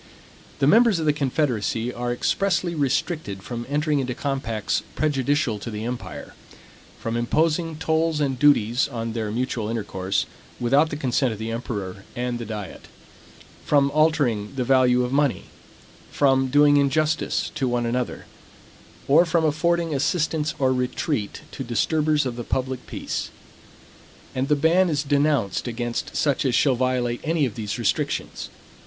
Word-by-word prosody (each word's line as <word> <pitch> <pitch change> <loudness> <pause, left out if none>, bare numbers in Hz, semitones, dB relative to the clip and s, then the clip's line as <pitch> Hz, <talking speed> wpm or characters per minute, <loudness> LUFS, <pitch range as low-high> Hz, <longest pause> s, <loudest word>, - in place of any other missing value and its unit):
The 135 - +1
members 225 - +5
of 160 - -2
the 150 - +3
confederacy 125 -5 -1
are 120 0 -3
expressly 175 +7 0
restricted 140 - -1
from 120 +1 -6
entering 150 0 +1
into 125 -2 -2
compacts 130 -7 -2
prejudicial 140 -6 0
to 115 - -6
the 105 0 -5
empire; 120 0 -6 0.7
from 115 0 -3
imposing 160 +7 +1
tolls 160 0 0
and 135 -4 -1
duties 125 -4 +4
on 115 -4 -4
their 110 -2 -2
mutual 115 -1 -2
intercourse, 100 -4 -2 0.3
without 140 +6 +3
the 145 - -4
consent 130 -3 0
of - - -8
the 110 +2 -4
emperor 100 -5 -5
and 120 -2 -3
diet; 105 -4 -7 0.8
from 140 -1 +3
altering 145 -8 +1
the 130 - 0
value 125 -1 +4
of 125 +1 -3
money; 140 -2 +1 0.7
from 135 -1 +2
doing 145 +2 +5
injustice 150 +3 +1
to 130 - -1
one 120 -1 0
another; 125 +1 -2 0.8
or 155 +5 +6
from 170 -1 +1
affording 165 +2 +1
assistance 150 +1 0
or 130 -1 +2
retreat 125 -2 -2
to 135 - -6
disturbers 150 +4 +1
of 125 -2 -3
the 120 - -4
public 130 +1 -3
peace. - - -4 1.0
And 130 +1 -1
the 150 - +3
ban 170 +5 +3
is 145 -2 0
denounced 140 -8 +1
against 120 0 -3
such 140 -3 +1
as 130 -3 +1
shall 140 - +4
violate 125 -1 0
any 160 -2 +1
of 120 - -3
these 105 -2 -4
restrictions. - - -2
130 Hz, 150 wpm, -24 LUFS, 120-150 Hz, 1.0 s, or